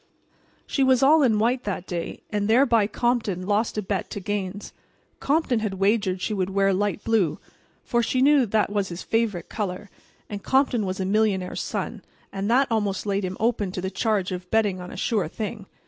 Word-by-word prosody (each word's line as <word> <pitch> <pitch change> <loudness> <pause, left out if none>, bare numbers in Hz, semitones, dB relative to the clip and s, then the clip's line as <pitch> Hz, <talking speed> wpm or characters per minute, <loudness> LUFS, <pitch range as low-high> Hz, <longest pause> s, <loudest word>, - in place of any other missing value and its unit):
She 275 - 0
was 260 0 +4
all 305 +3 +6
in 235 -6 +3
white 245 +4 +1
that 195 -3 -3
day; 170 -2 -5
and 205 -1 0
thereby 230 -2 +4
Compton 220 -5 -1
lost 210 +3 0
a 210 - -1
bet 190 -1 -2
to - - -5
Gaines. 200 0 -4 0.5
Compton 280 -5 +1
had 215 -3 -2
wagered 195 -1 +1
she 215 - -1
would 190 -2 -1
wear 195 0 +2
light 205 +2 -1
blue, 215 -8 +1 0.5
for 240 -2 +1
she 245 +2 0
knew 275 -2 +5
that 210 0 +1
was 205 -2 -1
his 170 +1 -6
favorite 220 -7 -1
color, 200 -1 -4 0.4
and 205 -1 -6
Compton 260 -4 +2
was 185 +1 -3
a 190 - -1
millionaire's 195 -2 0
son, - - -4 0.3
and 195 +1 -2
that 260 +4 +4
almost 205 -3 0
laid 200 -1 0
him 185 0 -4
open 220 -4 0
to - - -3
the 190 +1 -3
charge 200 -2 0
of 180 0 -6
betting 205 -4 +1
on 180 - -8
a - - -9
sure 215 -8 0
thing. 205 +2 -6
205 Hz, 195 wpm, -24 LUFS, 190-230 Hz, 0.5 s, all